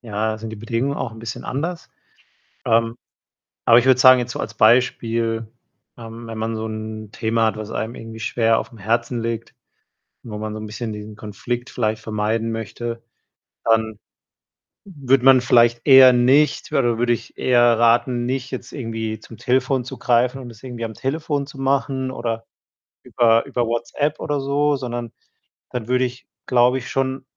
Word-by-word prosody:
ja, 110 -1 -2
sind 110 0 -7
die 110 - -7
Bedingungen 115 +6 -2
auch 125 - -3
'n 110 - -12
bisschen 115 0 -7
anders. 165 +5 -4 0.7
Ähm, 115 +1 +2 0.7
aber 115 +1 +7
ich 120 - -4
würde 130 -1 +5
sagen, 130 0 +8
jetzt 120 - -4
so - - -6
als 110 - -5
Beispiel, 115 -1 +2 0.5
ähm, 115 0 -9
wenn 115 - -6
man 110 +1 -2
so 110 - -4
'n 110 0 -6
Thema 115 0 0
hat, 110 - -1
was 110 0 -7
einem 110 +2 -3
irgendwie 115 0 -9
schwer 115 0 +2
aufm 115 - -10
Herzen 115 +3 -1
liegt, 115 0 -4 0.7
wo 105 -3 -7
man 110 0 -4
so 110 - -5
'n 110 - -6
bisschen 110 +2 -5
diesen 105 0 -8
Konflikt 110 +4 -5
vielleicht 110 -2 -2
vermeiden 110 +1 -1
möchte, 115 +1 -5 0.6
dann 110 -2 +1 0.9
würde 135 -8 0
man 135 -1 +7
vielleicht 120 -1 +4
eher 130 -2 +9
nicht 130 +5 +3
oder 120 -4 +2
würde 120 0 +2
ich 120 - -5
eher 120 -2 +4
raten, 120 +1 +3
nicht 130 +1 -3
jetzt 130 - -6
irgendwie 110 -4 -4
zum 115 - -13
Telefon 130 +3 +1
zu - - -8
greifen 125 +2 +1
und 125 - -9
das 110 -1 -16
irgendwie 120 -3 -6
am 110 - -5
Telefon 145 +2 -2
zu 140 -1 -13
machen 135 -1 0
oder 115 -2 -4 0.6
über 115 -1 +3
über 120 - -1
WhatsApp 130 +6 -2
oder 145 -1 -2
so, 145 +2 +1
sondern 120 -2 -5 0.6
dann 120 -3 -4
würde 125 +1 +2
ich, 125 +1 -7 0.2
glaube 125 +1 +3
ich, 130 - -9
schon 135 0 -2
120 Hz, 175 wpm, -21 LUFS, 115-130 Hz, 0.9 s, eher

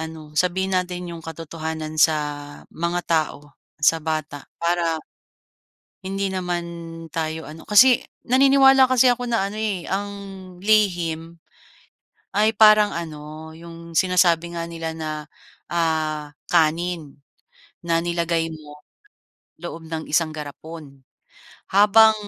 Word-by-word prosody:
ano 160 -1 -8
sabihin 190 +3 0
natin 180 -1 -2
yung 165 - -8
katotohanan 160 -1 -5
sa 155 0 +5 0.6
mga 170 +1 -1
tao, 150 -3 -1 0.3
sa 160 +2 +3
bata 155 -2 -4
para 170 -1 0 1.0
hindi 195 0 -3
naman 180 -2 -2 0.5
tayo 160 0 -3
ano, 155 +1 -11
kasi, 240 +4 +7 0.2
naniniwala 270 0 +6
kasi 255 -1 +5
ako 245 0 -4
na 230 -5 +1
ano, 215 - -5
eh, 200 -5 -2
ang 200 +1 -2 0.5
lihim 175 -6 +1 1.0
ay 215 +2 +4
parang 215 -1 +7
ano 155 -1 -7
yung 170 0 -11
sinasabi 175 -1 +3
nga 170 - -3
nila 165 -1 -5
na, 155 -1 -3 0.6
ah, 155 -3 -1 0.2
kanin 165 -2 +1 0.7
na 165 0 +2
nilagay 170 -1 -1
mo 150 -1 -12 0.8
loob 165 -1 -7
ng 160 -1 -4
isang 160 +1 +1
garapon. 150 -1 -9 0.7
Habang 220 +2 +7
170 Hz, 115 wpm, -22 LUFS, 160-190 Hz, 1.0 s, kasi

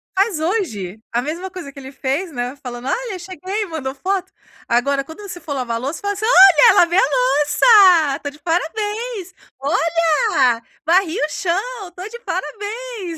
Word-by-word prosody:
faz 390 -4 +1
hoje 225 - -2
a 240 +1 0
mesma 335 +7 -5
coisa 350 -6 -8
que 275 - -12
ele 265 0 -10
fez, 280 +6 -3
né, 245 +2 -4
falando: 245 0 -7
"Olha, 470 -6 -2
cheguei", 375 +4 -5
mandou 290 -6 -5
foto. 380 +5 -2 0.4
Agora 275 +4 +1
quando 320 +7 -11
você 365 -3 -8
for 295 -4 -6
lavar 240 -4 -2
louça 275 - -4
faz 405 0 -1
assim: - - 0
"Olha, 380 -9 +8
lavei 345 +2 +4
a - - +5
louça, 360 - +4
tô 285 - -3
de 295 +1 -16
parabéns. 415 +5 -3 0.3
Olha, 300 -5 +1 0.2
varri 345 +1 +2
o 300 - 0
chão, 390 +4 -3
tô 365 +3 -7
de 475 +1 -9
parabéns". 425 -6 -5
340 Hz, 165 wpm, -19 LUFS, 280-395 Hz, 0.4 s, Olha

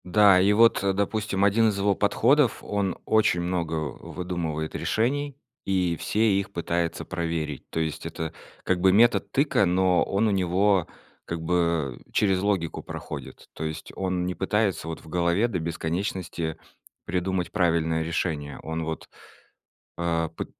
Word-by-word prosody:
Да, 95 +1 +6
и 100 +2 +4
вот, 115 -2 +5
э, 100 -1 +2
допустим, 100 0 -1
один 110 +2 +4
из 100 - -2
его 100 +1 +2
подходов: 120 +6 +3
он 100 -3 -1
очень 110 -5 +3
много 85 -2 -2
выдумывает 80 +1 -4
решений 140 +5 -1 0.3
и 90 -3 +1
все 105 -2 +2
их 100 - -5
пытается 85 -1 -2
проверить. 80 -5 -3
То - - -3
есть 80 -2 -3
это 80 -1 -5 0.3
как 90 -1 0
бы 95 0 +5
метод 115 +5 +4
тыка, 140 -7 +3
но 90 0 +3
он 100 +3 +1
у - - +2
него 95 0 +2 0.4
как 85 -1 -4
бы 85 -6 0
через 95 -3 +2
логику 95 -5 -1
проходит. - - -8
То - - -6
есть 80 0 -5
он 90 -2 -1
не 90 - -2
пытается 100 -2 0
вот 80 - -5
в - - -16
голове 85 +6 +1
до 100 -7 -2
бесконечности 85 0 -3 0.5
придумать 90 +1 -1
правильное 80 -4 +1
решение. 80 -3 -3
Он 80 +1 -3
вот, 80 0 -5 0.9
э, 85 -1 0
п - - -3
90 Hz, 150 wpm, -26 LUFS, 85-100 Hz, 0.9 s, Да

